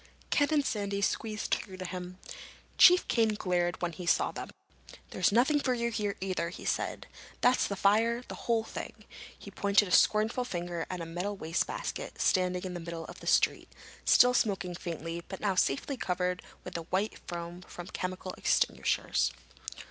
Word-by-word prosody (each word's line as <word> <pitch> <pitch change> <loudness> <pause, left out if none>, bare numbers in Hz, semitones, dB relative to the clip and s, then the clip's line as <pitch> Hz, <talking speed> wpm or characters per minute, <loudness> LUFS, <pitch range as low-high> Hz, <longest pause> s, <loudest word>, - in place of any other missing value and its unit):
Ken 290 - +4
and 300 -3 +2
Sandy 200 -3 -1
squeezed 215 +2 -1
through 190 -2 -3
to 185 - -6
him. 180 0 -6 0.6
Chief 360 0 +8
Kane 225 -3 +2
glared 180 -3 -1
when 175 - 0
he 170 +2 -8
saw - - +3
them. - - -7 0.6
"There's - - +2
nothing 265 +7 +4
for 255 -3 +1
you 235 0 -1
here 210 -2 -1
either," 185 -3 -2
he 175 - -9
said. - - -1 0.4
"That's 250 +1 +4
the 200 - -3
fire—the 225 +5 +2
whole 230 -2 0
thing!" - - -8 0.3
He - - -11
pointed 200 0 +3
a - - -7
scornful 220 +6 +4
finger 175 -6 -4
at 180 -2 -4
a - - -4
metal 180 +5 -3
wastebasket 165 - -3
standing 180 -1 +2
in 185 -1 -4
the 175 - -4
middle 165 -1 -6
of - - -10
the - - -10
street, - - +3 0.4
still 250 0 +6
smoking 195 -6 0
faintly 170 -1 -5
but 190 - -7
now 205 -2 +1
safely 185 - 0
covered 180 -3 -1 0.2
with 180 - -8
the 170 - -3
white 195 +5 -1
foam 175 +1 -6
from 175 -1 -9
chemical 185 +1 -4
extinguishers. - - +1
190 Hz, 170 wpm, -30 LUFS, 175-220 Hz, 0.6 s, Chief